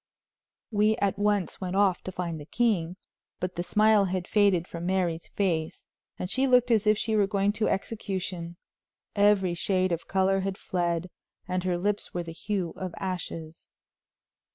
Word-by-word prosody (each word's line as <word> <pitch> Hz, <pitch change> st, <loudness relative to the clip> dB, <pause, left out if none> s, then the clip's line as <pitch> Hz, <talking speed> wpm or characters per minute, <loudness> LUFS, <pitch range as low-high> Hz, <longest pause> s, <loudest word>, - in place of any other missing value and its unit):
We 215 Hz, +1 st, +3 dB
at 200 Hz, -3 st, 0 dB
once 205 Hz, -4 st, 0 dB
went 185 Hz, 0 st, -3 dB
off 195 Hz, -2 st, +3 dB
to 185 Hz, -, -4 dB
find 170 Hz, -3 st, -4 dB
the 145 Hz, -, -9 dB
king, 185 Hz, -8 st, +1 dB, 0.4 s
but 180 Hz, 0 st, -3 dB
the 175 Hz, -, -2 dB
smile 210 Hz, +3 st, +4 dB
had 185 Hz, -1 st, -2 dB
faded 200 Hz, -5 st, +3 dB
from 170 Hz, +1 st, -5 dB
Mary's 180 Hz, -3 st, 0 dB
face, 165 Hz, -6 st, -2 dB, 0.3 s
and 180 Hz, -, -3 dB
she 260 Hz, +7 st, +1 dB
looked 250 Hz, -1 st, +4 dB
as 220 Hz, -2 st, +3 dB
if 215 Hz, 0 st, +5 dB
she 220 Hz, 0 st, 0 dB
were 205 Hz, -2 st, +3 dB
going 200 Hz, 0 st, +1 dB
to 215 Hz, +1 st, 0 dB
execution. 185 Hz, -5 st, -3 dB, 0.6 s
Every 200 Hz, -3 st, +4 dB
shade 185 Hz, +1 st, +1 dB
of 170 Hz, 0 st, -3 dB
color 195 Hz, 0 st, +2 dB
had 195 Hz, 0 st, -2 dB
fled, 175 Hz, -1 st, -2 dB, 0.4 s
and 185 Hz, 0 st, -1 dB
her 180 Hz, -1 st, +1 dB
lips 205 Hz, +2 st, -2 dB
were 175 Hz, -, -1 dB
the 165 Hz, -1 st, -8 dB
hue 190 Hz, -1 st, -3 dB
of 185 Hz, -2 st, -5 dB
ashes. 165 Hz, -4 st, -5 dB
190 Hz, 170 wpm, -27 LUFS, 175-205 Hz, 0.6 s, if